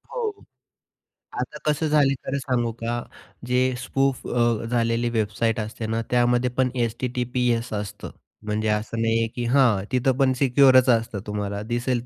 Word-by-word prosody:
हो. 460 -4 -1 1.1
आता - - -4
कसं 155 +1 +1
झालं 145 -2 +3
खरं 140 - -2
सांगू 125 -3 -1
का, 115 +1 -2 0.5
जे 125 +1 +1
स्पूफ 135 +1 -1
अ, 120 -2 +1
झालेली 115 0 +1
वेबसाईट 110 0 0
असते 110 +1 -5
ना, 115 +1 -1
त्यामध्ये 120 0 +2
पण 130 -1 +3
एस-टी-टी-पी-एस 125 0 -1
असतं. 105 0 -5 0.3
म्हणजे 105 +1 -1
असं 105 +2 -1
नाहीये 115 0 +1
की 120 - -3
हां, 125 -8 +4
तिथं 130 0 +1
पण 135 -2 +3
सिक्योररच 130 -1 +5
असतं 115 -3 +1
तुम्हाला. 100 -1 -3
दिसेल 120 +1 -1
120 Hz, 145 wpm, -24 LUFS, 115-130 Hz, 1.1 s, सिक्योररच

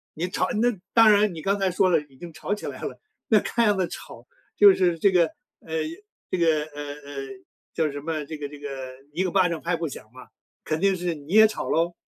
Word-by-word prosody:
你 170 +4 -2
吵 185 0 -1
那 245 -1 +2 0.2
当 225 -2 +7
然 205 -2 +3
你 160 - -7
刚 200 +4 0
才 195 - +2
说 185 +1 +2
了， 165 -3 +4
已 135 - -21
经 170 0 -10
吵 205 - -3
起 - - -9
来 - - -7
了， - - -6 0.3
那 215 -2 +5
看 235 +3 0
样 205 -2 +3
子 185 -2 +1
吵， - - -10 0.3
就 400 -2 +9
是 175 -2 +1
这 195 +4 +3
个， 180 -2 +5 0.4
呃， 160 - -10 0.6
这 185 - 0
个， 160 -3 +2
呃 145 -1 -8 0.2
呃， 140 -1 -7 0.5
叫 155 -2 0
什 145 0 -6
么， 155 -1 -3
这 155 +2 -7
个 145 -1 -5
这 145 - -11
个 145 - -6 0.4
一 180 +4 0
个 180 - -1
巴 185 -3 +3
掌 165 -2 -4
拍 175 +1 0
不 165 -1 -3
响 135 - -8
嘛， 130 0 -13 0.4
肯 155 0 -2
定 195 -1 +3
是 175 -1 -2
你 150 +5 -9
也 220 0 +8
吵 215 - -5
喽。 170 +1 +1
170 Hz, 260 characters per minute, -25 LUFS, 155-195 Hz, 0.6 s, 就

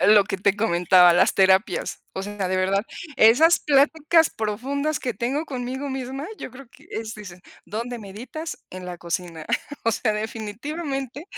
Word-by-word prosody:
Lo 205 -1 +6
que 195 - -3
te 200 +1 +1
comentaba, 180 -3 +5
las 175 - +3
terapias. 190 +1 +2
O 190 - -4
sea, 205 -2 -3
de 185 - 0
verdad, 195 +2 +1 0.3
esas 275 +10 +6
pláticas 305 +3 +3
profundas 270 +8 -2
que 245 -3 -3
tengo 260 +9 -1
conmigo 265 0 -4
misma. 265 +2 -5
Yo - - -7
creo 260 0 -12
que - - -20
es 220 -1 -5
dices, 185 -4 -10 0.3
¿dónde 235 +3 -4
meditas? 240 +11 -8
En 185 0 -8
la 175 -1 -6
cocina. 170 -2 -4 0.4
O 230 - +3
sea, 220 -1 0
definitivamente, 265 +7 -5
225 Hz, 160 wpm, -24 LUFS, 195-275 Hz, 0.4 s, Lo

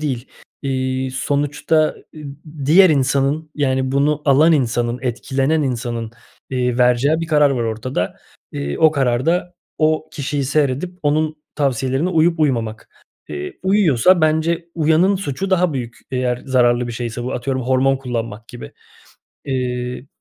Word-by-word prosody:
değil. 135 -5 -3 0.3
Eee, 130 -1 -1
sonuçta, 145 +4 0 0.4
ı - - -9 0.5
diğer 180 +4 +7
insanın, 140 +2 +1
yani, 130 -2 0
bunu 145 +2 +1
alan 150 +4 +5
insanın, 120 -4 0
etkilenen 135 +5 0
insanın, 120 -3 -3 0.4
eee, 125 -1 -1
vereceği 125 +6 +3
bir 165 - -3
karar 150 -3 +4
var 125 -3 -1
ortada. 110 -3 -3 0.4
Eee, 70 0 -4
o 160 - +6
karar 130 -3 0
da 175 +1 0 0.2
o 155 0 +1
kişiyi 140 -1 -2
seyredip 145 +5 -1
onun 155 +1 +1 0.2
tavsiyelerine 135 +2 0
uyup 165 -1 +2
uymamak. 115 -7 -1 0.4
Eee, 75 -1 -6
uyuyorsa 185 - +4
bence 160 +2 +1
uyanın 165 +5 +3
suçu 190 +1 -4
daha 180 -3 +2
büyük 120 -4 -5
eğer 125 -1 -1
zararlı 125 -2 +2
bir - - -4
şeyse 120 +1 -4
bu. 125 - -3
Atıyorum 130 +1 -2
hormon 130 +2 +2
kullanmak 115 -4 -5
gibi. 120 - -10 0.7
Eee, 125 -1 -3
135 Hz, 135 wpm, -19 LUFS, 125-155 Hz, 0.7 s, diğer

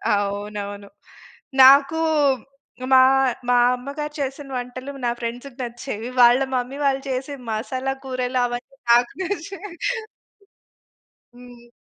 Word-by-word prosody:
అవునవును. 205 0 -4 0.7
నాకు 275 +4 +7 0.9
మా 260 - +9 0.5
మా 245 - +4 0.2
అమ్మగారు 285 +4 -5
చేసిన 275 +1 -4
వంటలు 250 +2 -6
నా 240 - +2
ఫ్రెండ్స్‌కి 245 +3 -6
నచ్చేవి. 240 -1 -6
వాళ్ళ 240 +1 +7 0.2
మమ్మీ 250 +2 -3
వాళ్ళు 270 -1 +1
చేసే 265 +2 -3 0.2
మసాలా 260 +4 -2
కూరలు 255 -1 -2
అవన్నీ 245 +2 -6
నాకు 240 +1 +4
నచ్చేవి. 390 0 -6 1.6
హ్మ్. 245 -1 -15
250 Hz, 100 wpm, -22 LUFS, 240-275 Hz, 1.6 s, మా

